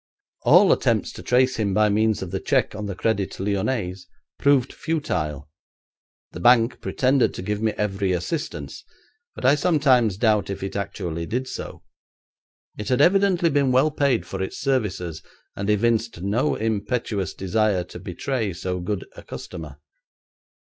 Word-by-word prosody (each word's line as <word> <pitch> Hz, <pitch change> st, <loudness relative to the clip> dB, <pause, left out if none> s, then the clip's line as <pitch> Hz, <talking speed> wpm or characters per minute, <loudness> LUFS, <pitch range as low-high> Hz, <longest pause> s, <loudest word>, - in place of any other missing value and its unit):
All -, -, +6 dB
attempts -, -, +1 dB
to -, -, -10 dB
trace 130 Hz, +1 st, +2 dB
him 100 Hz, -4 st, 0 dB
by 105 Hz, 0 st, +4 dB
means 110 Hz, 0 st, +1 dB
of 90 Hz, -, -7 dB
the 95 Hz, -, -2 dB
cheque -, -, +1 dB
on 105 Hz, 0 st, -5 dB
the 100 Hz, -, -4 dB
Crédit 100 Hz, -1 st, -1 dB
Lyonnais 100 Hz, -1 st, -1 dB, 0.4 s
proved 140 Hz, -3 st, +3 dB
futile. 85 Hz, -, -2 dB, 0.8 s
The -, -, -8 dB
bank 120 Hz, 0 st, +4 dB
pretended 130 Hz, 0 st, +1 dB
to -, -, -6 dB
give 105 Hz, +2 st, -2 dB
me 110 Hz, -1 st, +1 dB
every 100 Hz, -2 st, -1 dB
assistance, 90 Hz, -, -4 dB, 0.5 s
but -, -, -6 dB
I 130 Hz, -, +6 dB
sometimes 140 Hz, -, +3 dB
doubt 110 Hz, -3 st, +2 dB
if 100 Hz, -, -5 dB
it 95 Hz, -, -5 dB
actually 85 Hz, -4 st, -4 dB
did 125 Hz, +4 st, -2 dB
so. -, -, -7 dB, 1.0 s
It 105 Hz, -, -4 dB
had 125 Hz, -, +2 dB
evidently 180 Hz, 0 st, +4 dB
been 140 Hz, -2 st, +2 dB
well 135 Hz, +5 st, +3 dB
paid 140 Hz, -5 st, +1 dB
for 95 Hz, -, -5 dB
its 95 Hz, -, -4 dB
services, 95 Hz, -, -1 dB, 0.3 s
and 100 Hz, +1 st, -3 dB
evinced 115 Hz, -1 st, +1 dB
no 115 Hz, +9 st, +1 dB
impetuous 110 Hz, -2 st, -2 dB
desire 100 Hz, -1 st, +1 dB
to 90 Hz, -, -10 dB
betray 105 Hz, +4 st, -3 dB
so 90 Hz, +1 st, -3 dB
good 95 Hz, +2 st, -3 dB
a -, -, -10 dB
customer. 75 Hz, -4 st, -8 dB
110 Hz, 155 wpm, -23 LUFS, 95-130 Hz, 1.0 s, All